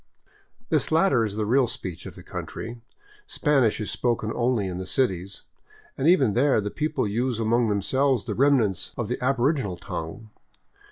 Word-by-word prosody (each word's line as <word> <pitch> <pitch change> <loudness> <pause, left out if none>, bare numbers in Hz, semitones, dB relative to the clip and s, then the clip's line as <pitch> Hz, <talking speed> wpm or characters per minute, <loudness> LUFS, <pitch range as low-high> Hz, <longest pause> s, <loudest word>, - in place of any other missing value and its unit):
This 155 -2 0
latter 160 -7 +3
is 105 -2 -3
the 110 0 -1
real 125 +3 +3
speech 90 -6 -6
of - - -10
the - - -12
country. 120 +1 -7 0.5
Spanish 140 - +2
is 105 -3 -3
spoken 115 -3 -1
only 120 -4 +1
in 90 -1 -4
the 95 - -6
cities, 95 -7 -1 0.5
and 135 - 0
even 140 - +4
there 135 +1 +3
the 105 -1 -3
people 155 -7 -1
use 120 +3 -1
among 115 +1 +2
them 100 -2 0
selves 135 -1 +1
the - - -2
remnants 125 -8 +2
of - - -3
the - - -3
aboriginal 130 - +1
tongue. 95 +9 -7
120 Hz, 170 wpm, -25 LUFS, 105-135 Hz, 0.5 s, even